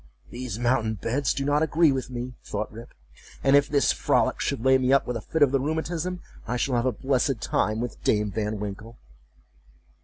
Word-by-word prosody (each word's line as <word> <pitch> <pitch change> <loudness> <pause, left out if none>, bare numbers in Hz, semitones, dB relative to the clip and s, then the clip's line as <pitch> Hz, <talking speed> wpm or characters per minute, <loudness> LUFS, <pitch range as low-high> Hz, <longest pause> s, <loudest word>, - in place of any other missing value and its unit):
"These 120 -4 -5
mountain 120 -2 +1
beds 125 +7 -1
do 135 - -2
not 145 +1 +2
agree 160 0 +4
with 130 -2 -3
me," 125 0 -5
thought 105 - -4
Rip; 115 +3 -11 0.5
"and 135 +1 +5
if 145 0 +4
this 140 -1 +3
frolic - - +1
should 115 - -2
lay 130 0 +5
me 130 0 +1
up 140 - +4
with 125 - -3
a 115 - -3
fit 160 +7 +1
of 140 - +4
the 135 - +2
rheumatism, 160 +5 -2 0.3
I 125 +2 -1
shall 130 +2 -1
have 120 +1 +1
a - - +2
blessed 130 +2 0
time 110 +1 0
with 120 +1 -5
Dame 105 -1 +1
Van 105 0 -2
Winkle." 105 +3 -7
125 Hz, 205 wpm, -26 LUFS, 115-140 Hz, 0.5 s, and